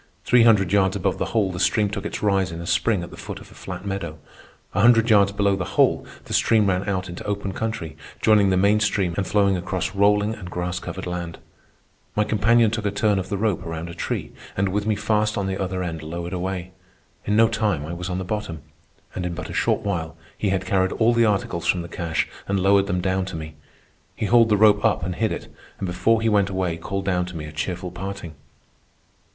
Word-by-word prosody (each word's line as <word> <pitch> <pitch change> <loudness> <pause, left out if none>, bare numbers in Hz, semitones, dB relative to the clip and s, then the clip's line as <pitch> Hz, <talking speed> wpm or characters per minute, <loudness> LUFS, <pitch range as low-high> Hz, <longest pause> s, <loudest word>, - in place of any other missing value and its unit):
Three 125 -1 +5
hundred 105 -5 +4
yards 95 -2 +3
above - - -1
the - - 0
hole 105 -4 0
the 90 - -6
stream 105 +3 +2
took 100 - -4
its - - -6
rise 95 -3 +2
in 85 - -6
a 85 - -6
spring 85 +3 +1
at - - -9
the - - -11
foot - - -7
of - - -15
a - - -14
flat - - -8
meadow. 95 -6 -4 0.6
A 100 - +1
hundred 115 0 +5
yards 100 -2 +5
below 100 -1 +1
the 95 -2 -5
hole - - +3 0.2
the - - -6
stream 110 -2 +4
ran 95 +1 0
out 95 -1 -1
into 85 -1 -7
open 100 -1 -2
country, 110 -8 -4 0.2
joining 105 -2 +4
the 95 - +2
main 100 +3 +4
stream 100 -4 +1
and 100 - -1
flowing 100 -2 +3
across 90 +1 -3
rolling 105 +2 +3
and 95 -5 -8
grass 90 0 -3
covered 95 +2 -6
land. 85 -2 -4 0.8
My 105 - +3
companion 110 +1 +3
took 110 -2 -2
a - - +2
turn 100 0 +1
of 95 - -5
the 100 - -1
rope 105 -3 0
around 80 0 -5
a - - -7
tree, 85 - -3 0.3
and 100 0 +1
with 105 +2 -1
me 110 - +2
fast 105 +1 0
on 100 - -1
the 95 0 -2
other 95 -1 -2
end 80 -3 -4
lowered 85 +3 -5
away. 95 0 -3 0.5
In 105 - +1
no 115 +1 +6
time 105 -9 0
I 80 - -5
was 90 +1 -5
on 90 - -2
the 95 - -3
bottom. 90 -7 -4 0.5
And 90 - -4
in 90 -1 -3
but 90 - -6
a - - -7
short - - +1
while 85 -6 -3 0.2
he 105 - -1
had 95 0 -1
carried 95 -1 +1
all 115 +1 +3
the 115 0 +4
articles 95 -5 -1
from 90 -2 +2
the - - -7
cache 85 -1 -2 0.2
and 100 0 0
lowered 100 +1 +4
them 90 -2 0
down 95 +1 0
to 95 -2 -6
me. 80 -1 -6 0.6
He - - -2
hauled 115 +1 +5
the 105 - +4
rope 105 0 +5
up 110 -7 +2
and 90 +1 -2
hid 110 +4 0
it, - - -5 0.3
and 100 - -4
before 95 +6 +1
he - - +2
went 100 -2 +3
away 95 -3 -1
called 95 +4 -4
down 90 -2 0
to 90 -2 -7
me 75 - -5
a 75 - -8
cheerful 90 +3 -4
parting. 95 -2 -6
95 Hz, 235 wpm, -23 LUFS, 90-105 Hz, 0.8 s, no